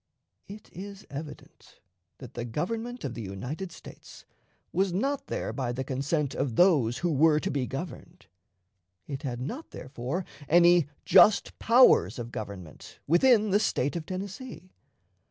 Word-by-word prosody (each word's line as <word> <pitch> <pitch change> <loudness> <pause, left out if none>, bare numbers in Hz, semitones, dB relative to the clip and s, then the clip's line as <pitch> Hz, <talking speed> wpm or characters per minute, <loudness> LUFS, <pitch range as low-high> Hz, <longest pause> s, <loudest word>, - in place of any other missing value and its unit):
It 210 +2 -12
is 200 +2 -9
evident 145 +2 -10 0.4
that 130 -4 -11
the 120 - -4
Government 225 - -4
of 130 - -3
the 120 - -6
United 125 - -6
States - - -13 0.5
was 190 +2 +1
not 270 +10 -1
there - - -3
by 130 -3 -2
the 130 +2 -3
consent 140 +2 -1
of 125 -5 -2
those 145 -10 +4
who 175 -1 -1
were 155 +1 +4
to - - -3
be 135 -3 -1
governed. 160 +6 -8 0.8
It 140 -2 -6
had 125 -5 -4
not, 245 - -6
therefore, 130 +7 -5 0.2
any 175 -1 +5 0.2
"just 210 - +5
powers" 230 - +5
of 120 -1 -6
government 95 -8 -8
within 215 - +4
the 205 - +4
State 145 -9 0
of 165 -2 -5
Tennessee. 190 +1 -7
155 Hz, 145 wpm, -28 LUFS, 130-195 Hz, 0.8 s, any